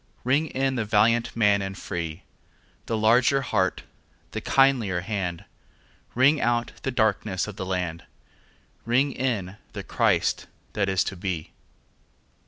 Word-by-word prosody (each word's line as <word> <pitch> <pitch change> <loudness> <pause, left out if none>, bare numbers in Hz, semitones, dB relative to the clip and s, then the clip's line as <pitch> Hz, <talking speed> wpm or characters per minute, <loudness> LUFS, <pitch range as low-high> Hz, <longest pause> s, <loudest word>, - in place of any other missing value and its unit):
Ring 140 +6 +2
in 135 -1 -1
the 115 - 0
valiant 110 +2 +2
man 105 -3 +3
and 95 0 -5
free, 85 -1 -5 0.6
The 115 - -1
larger 120 +5 +4
heart, 95 -7 0 0.5
the 110 - -4
kindlier 120 -11 +3
hand; 90 -4 -3 0.7
Ring 140 +5 +4
out 120 0 +1
the - - -2
darkenss 105 -4 0
of 105 - -7
the 95 - -5
land, 90 -3 -3 0.8
Ring 130 +4 +2
in 110 -8 -2 0.2
the - - -5
Christ - - +1 0.3
that 100 -2 0
is 95 -1 +2
to 95 - -4
be. 90 -3 -4
110 Hz, 135 wpm, -25 LUFS, 95-125 Hz, 0.8 s, larger